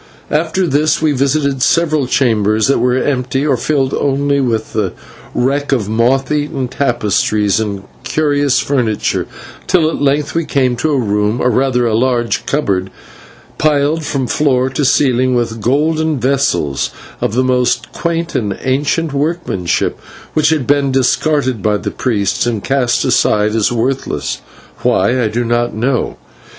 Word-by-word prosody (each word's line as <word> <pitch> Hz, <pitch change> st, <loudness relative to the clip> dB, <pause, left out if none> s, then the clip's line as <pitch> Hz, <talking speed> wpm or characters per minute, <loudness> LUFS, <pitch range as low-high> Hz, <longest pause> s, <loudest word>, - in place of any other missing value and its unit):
After 160 Hz, +4 st, +1 dB
this 150 Hz, 0 st, +1 dB
we 155 Hz, -1 st, +2 dB
visited 140 Hz, 0 st, 0 dB
several 155 Hz, 0 st, +2 dB
chambers 110 Hz, -5 st, +2 dB
that 140 Hz, -, +2 dB
were 125 Hz, +1 st, +2 dB
empty, 130 Hz, 0 st, -1 dB
or 140 Hz, -3 st, +2 dB
filled 135 Hz, +2 st, 0 dB
only 140 Hz, +1 st, +1 dB
with 115 Hz, -4 st, -2 dB
the 105 Hz, -4 st, -1 dB, 0.4 s
wreck 140 Hz, +3 st, 0 dB
of 120 Hz, -7 st, +1 dB
moth 125 Hz, +5 st, +1 dB
eaten 145 Hz, -3 st, -1 dB
tapestries 105 Hz, -5 st, +1 dB
and 100 Hz, -3 st, -3 dB, 0.2 s
curious 145 Hz, -3 st, +1 dB
furnitures, 120 Hz, -7 st, 0 dB, 0.4 s
till 160 Hz, -, +3 dB
at -, -, -5 dB
length 145 Hz, +1 st, +1 dB
we 165 Hz, -, 0 dB
came 130 Hz, -5 st, +1 dB
to 140 Hz, +6 st, 0 dB
a 145 Hz, -, +1 dB
room, 105 Hz, -1 st, 0 dB
or 125 Hz, -, +2 dB
rather 125 Hz, 0 st, +1 dB
a 115 Hz, -, 0 dB
large 120 Hz, 0 st, 0 dB
cupboard, 95 Hz, -10 st, 0 dB, 0.7 s
piled 150 Hz, +1 st, +1 dB
from 135 Hz, -3 st, -2 dB
floor 130 Hz, 0 st, +1 dB
to 145 Hz, -, -1 dB
ceiling 130 Hz, -2 st, +2 dB
with 115 Hz, -2 st, -2 dB
golden 155 Hz, +4 st, +1 dB
vessels 125 Hz, -, 0 dB, 0.3 s
of 105 Hz, -, -1 dB
the 130 Hz, -, +2 dB
most 125 Hz, -1 st, 0 dB
quaint 170 Hz, 0 st, -2 dB
and 105 Hz, -4 st, -2 dB
ancient 145 Hz, +4 st, 0 dB
workmanship, 140 Hz, -, -1 dB, 0.3 s
which 150 Hz, -1 st, +3 dB
had 155 Hz, -5 st, 0 dB
been 140 Hz, 0 st, +2 dB
discarded 130 Hz, -2 st, +1 dB
by 105 Hz, +1 st, +1 dB
the 95 Hz, -, -4 dB
priests 105 Hz, -2 st, -1 dB
and 115 Hz, -4 st, -2 dB
cast 125 Hz, -2 st, +1 dB
aside 105 Hz, -4 st, +2 dB
as 110 Hz, 0 st, +1 dB
worthless 125 Hz, +3 st, -2 dB, 0.4 s
why, 125 Hz, +1 st, +2 dB
I 115 Hz, -, +2 dB
do 120 Hz, +3 st, -2 dB
not 120 Hz, 0 st, 0 dB
know. 125 Hz, +3 st, -1 dB
130 Hz, 150 wpm, -15 LUFS, 115-145 Hz, 0.7 s, till